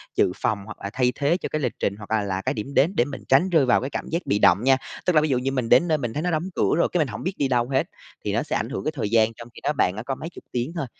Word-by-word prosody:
dự - - +3
phòng, 110 - -1
hoặc 105 - -9
là 100 - -3
thay 125 +1 +2
thế 150 +5 +1
cho - - -5
cái 155 - -2
lịch 125 - -1
trình 100 - 0
hoặc 105 0 -11
là 110 -2 +2
là 95 -1 -2
cái - - -1
điểm 125 +6 -5
đến 160 +7 +3
để 120 - +3
mình 140 0 -8
tránh 140 +8 +4
rơi 160 -6 +4
vào 125 - +3
cái 130 - -3
cảm - - -5
giác 170 +2 -2
bị 100 - +1
động 105 - +5
nha. 135 0 +5 0.3
Tức 180 - +2
là 155 - +6
ví 155 - 0
dụ 130 - +2
như 130 +2 -1
mình 130 -4 -2
đến 130 +8 +5
nơi 155 - +2
mình 120 -5 -4
thấy 150 - -2
nó 180 - 0
đóng 165 +4 -1
cửa - - +2
rồi 170 - +3
cái 180 - +1
mình 150 - +2
hổng 105 -4 -7
biết 185 - -2
đi 140 - +1
đâu 120 -1 +1
hết, 130 -1 +2 0.4
thì - - -1
nó - - +1
sẽ - - -3
ảnh - - -1
hưởng 95 - -4
cái - - -1
thời 115 -7 -2
gian 115 0 +3
trong 115 +1 -11
khi - - -12
đó 150 - +1
bạn 90 -9 +1
đã 110 - -5
có 135 +2 -3
mấy 160 - -7
chục - - -13
tiếng 125 +5 -2
thôi. 165 -5 -2
130 Hz, 360 wpm, -24 LUFS, 115-155 Hz, 0.4 s, là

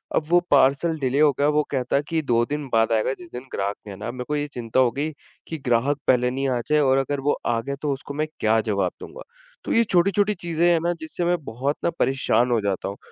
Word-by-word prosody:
अब - - +2
वो 175 +1 +5
parcel 140 +4 +3
delay 135 +1 0
हो 150 -1 +6
गया। 145 - +3
वो 150 0 +3
कहता 130 -1 -1
है 140 - +1
कि 165 -1 0
2 120 -4 +2
दिन 150 -1 -4
बाद 115 0 +3
आएगा 110 +4 +1
जिस 175 -1 -12
दिन 125 +1 -7
ग्राहक 100 +1 -2
ने 100 - -6
आना। 105 +5 -6
मेरे 125 0 -6
को 150 - 0
ये 145 0 -1
चिंता 120 +1 -1
हो 125 -2 +4
गयी, 150 +4 -3 0.3
कि 160 - -4
ग्राहक 125 +4 +2
पहले 125 -1 +3
नहीं 135 +1 -2
आ 125 -2 0
जाए 150 0 +3
और 135 -1 +3
अगर 140 +1 -2
वो 145 - +2
आ 115 -1 +1
गया, 140 +3 -4
तो 150 - -1
उसको 135 +1 -8
मैं 155 +2 -1
क्या 110 +1 +3
जवाब 100 -3 0
दूँगा। - - -10 0.4
तो - - -1
ये 230 - +5
छोटी-छोटी 200 +2 +2
चीजें 170 -1 -1
हैं 170 -1 +4
ना, 175 +1 0
जिससे 160 +2 -3
मैं 175 0 +2
बहुत 135 +6 -2
ना - - +3
परेशान 125 -2 +2
हो 115 - +3
जाता 100 -1 -2
हूँ 100 - -7
140 Hz, 255 wpm, -23 LUFS, 120-155 Hz, 0.4 s, हो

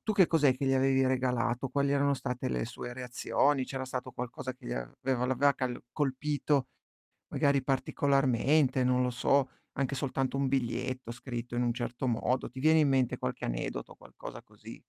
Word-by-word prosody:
tu 215 - 0
che 190 -4 +5
cos'è 145 -5 +4
che 140 - -2
gli 135 - +2
avevi 135 0 +3
regalato? 125 -1 0
Quali 140 +1 +1
erano 140 0 +3
state 125 -2 -3
le 60 -1 -1
sue 120 - -7
reazioni? 130 +2 +1
C'era 135 -1 -4
stato 130 0 -5
qualcosa 125 +1 -5
che - - -14
gli - - -3
aveva 120 - -2
l'aveva 140 +2 +3
cal 125 -3 -3
colpito, 145 -1 0 0.6
magari 140 -3 +2
particolarmente, 135 0 +2
non 125 0 +3
lo 125 - +1
so, 130 +2 +2 0.2
anche 140 0 -1
soltanto 135 -1 -1
un 135 -1 +1
biglietto 130 -1 -2
scritto 120 -1 -6
in 120 - +1
un 120 -1 +1
certo 120 +1 -3
modo, 125 +2 0
ti 130 - -11
viene 160 +2 +5
in 145 - +4
mente 130 -2 +2
qualche 65 - -4
aneddoto, - - -4
qualcosa - - -10
così? - - -12
130 Hz, 175 wpm, -30 LUFS, 125-140 Hz, 0.6 s, che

